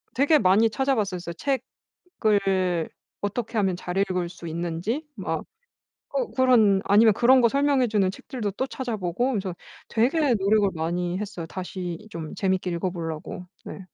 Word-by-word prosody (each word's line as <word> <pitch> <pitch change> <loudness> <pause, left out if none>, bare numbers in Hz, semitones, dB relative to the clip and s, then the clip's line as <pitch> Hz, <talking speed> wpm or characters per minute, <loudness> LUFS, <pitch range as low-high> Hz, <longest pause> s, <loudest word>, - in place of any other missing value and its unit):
되게 290 +4 +5
많이 210 +2 +4
찾아 270 +5 +1
봤었어요. 180 -6 -2 0.9
책을 190 -5 +1 0.3
어떻게 225 +3 -3
하면 190 -3 +1
잘 180 0 -5
읽을 185 -3 0
수 175 -1 -11
있는지 170 - -3
막 - - -3 0.7
어 - - -1
그런 225 -7 +4
아니면 210 +2 +6
그런 255 +5 +5
거 235 - +5
설명해 275 -1 +2
주는 205 -4 +2
책들도 210 +2 -5
또 230 +7 -2
찾아 260 -3 -4
보고 185 +7 -1
그래서 195 -5 -2 0.4
되게 260 +5 +2
노력을 205 0 +3
많이 175 +2 -2
했어요. 205 -5 -5
다시 185 +2 -6
좀 165 -5 -6
재밌게 185 -2 0
읽어 170 +2 -1
보려고 165 +1 -6 0.2
네. - - -7
200 Hz, 310 characters per minute, -25 LUFS, 180-235 Hz, 0.9 s, 아니면